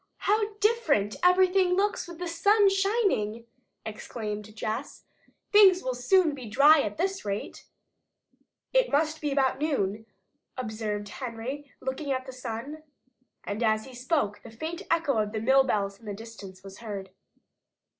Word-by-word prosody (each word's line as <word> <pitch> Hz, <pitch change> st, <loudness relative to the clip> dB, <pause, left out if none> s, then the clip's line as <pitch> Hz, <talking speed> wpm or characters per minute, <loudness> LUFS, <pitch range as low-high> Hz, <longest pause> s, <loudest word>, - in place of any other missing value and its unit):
"How 425 Hz, +1 st, +1 dB
different 420 Hz, -, +1 dB
everything 365 Hz, 0 st, +4 dB
looks 400 Hz, 0 st, 0 dB
with 345 Hz, -1 st, -9 dB
the 355 Hz, +1 st, -4 dB
sun 400 Hz, +5 st, +4 dB
shining!" 390 Hz, -, 0 dB, 0.4 s
exclaimed 215 Hz, -1 st, -6 dB
Jess. 225 Hz, +5 st, -4 dB, 0.5 s
"Things 390 Hz, -3 st, +7 dB
will 255 Hz, -, -1 dB
soon 315 Hz, +6 st, +3 dB
be 255 Hz, -5 st, -8 dB
dry 285 Hz, +6 st, +6 dB
at 205 Hz, -3 st, -4 dB
this 380 Hz, +1 st, -1 dB
rate." 200 Hz, 0 st, -5 dB, 1.1 s
"It -, -, +3 dB
must 310 Hz, +2 st, +1 dB
be 295 Hz, -2 st, -1 dB
about 270 Hz, -1 st, +1 dB
noon," 220 Hz, -8 st, -1 dB, 0.5 s
observed 215 Hz, -3 st, -3 dB
Henry, 255 Hz, +5 st, -6 dB
looking 275 Hz, +2 st, -3 dB
at 260 Hz, -1 st, -1 dB
the 260 Hz, -, -8 dB
sun. 255 Hz, +4 st, -6 dB, 0.6 s
And 205 Hz, +3 st, -4 dB
as 220 Hz, -1 st, +2 dB
he 265 Hz, -, -12 dB
spoke 250 Hz, -4 st, -1 dB
the -, -, -11 dB
faint 320 Hz, -, -6 dB
echo 325 Hz, -8 st, +2 dB
of 215 Hz, +1 st, -1 dB
mill 265 Hz, +4 st, +5 dB
bells 200 Hz, -5 st, -1 dB
in 225 Hz, -, -15 dB
the 205 Hz, -, -4 dB
distance 200 Hz, -4 st, -11 dB
was 195 Hz, -1 st, -11 dB
heard. 200 Hz, -4 st, -6 dB
260 Hz, 145 wpm, -27 LUFS, 215-345 Hz, 1.1 s, Things